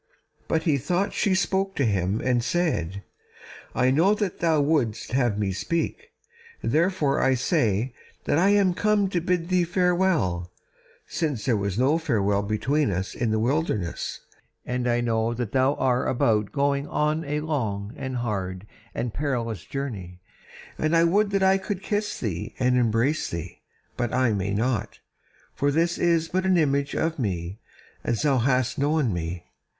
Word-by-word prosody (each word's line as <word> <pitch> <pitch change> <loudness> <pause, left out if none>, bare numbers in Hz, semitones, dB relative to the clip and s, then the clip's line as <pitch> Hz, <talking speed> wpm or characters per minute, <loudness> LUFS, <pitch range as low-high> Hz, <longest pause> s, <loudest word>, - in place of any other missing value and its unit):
But 160 - 0
he 150 -5 +2
thought 175 +9 0
she 195 -2 +1
spake 195 0 0
to 140 - +1
him 100 0 0
and 125 -2 +1
said: 100 - -1 0.7
"I 125 +1 +3
know 175 +9 +4
that 205 -4 -3
thou 165 -2 +2
wouldst 140 -9 0
have 120 -5 +1
me 100 -2 0
speak, 170 - -2 0.5
therefore 155 +1 +1
I 135 0 +3
say 120 - +1 0.3
that 145 - +2
I 190 +3 +4
am 200 -3 +4
come 205 0 +2
to 180 -3 -1
bid 175 0 -1
thee 180 -1 +3
farewell, 175 - +1 0.5
since 150 -9 -2
there 125 - +2
was 100 -1 -2
no 140 +6 +3
farewell 105 -10 +1
between 130 +8 0
us 95 0 -2
in 120 - -1
the 110 - +1
wilderness, 110 - -1 0.4
and 125 0 -2
I 120 0 +2
know 115 0 0
that 120 -3 -3
thou 135 +2 +2
are 125 -1 +1
about 110 -4 +1
going 140 0 0
on 150 +2 0
a 150 0 -2
long 110 -9 -2
and 130 -2 -5
hard 95 -5 -3 0.3
and 120 -2 -2
perilous 120 -7 -2
journey: 100 -11 -5 0.6
and 155 +2 +2
I 165 - +5
would 200 +5 +3
that 195 -1 +1
I 190 0 +4
could 195 -1 -4
kiss 210 0 -2
thee 95 -8 -4
and 125 0 +2
embrace 120 +5 +1
thee, 85 +1 -6 0.4
but 120 -2 -1
I 130 -3 +3
may 100 0 -1
not, 110 -1 -1 0.6
for 140 - +1
this 165 +4 +1
is 165 -2 +2
but 185 +3 -1
the 185 -2 +4
image 140 -2 +1
of 160 -1 -1
me 95 -3 -3 0.4
as 115 - -1
thou 140 -4 +3
hast 125 +1 +1
known 145 -5 +1
me. 85 +1 -4
130 Hz, 165 wpm, -25 LUFS, 110-165 Hz, 0.7 s, I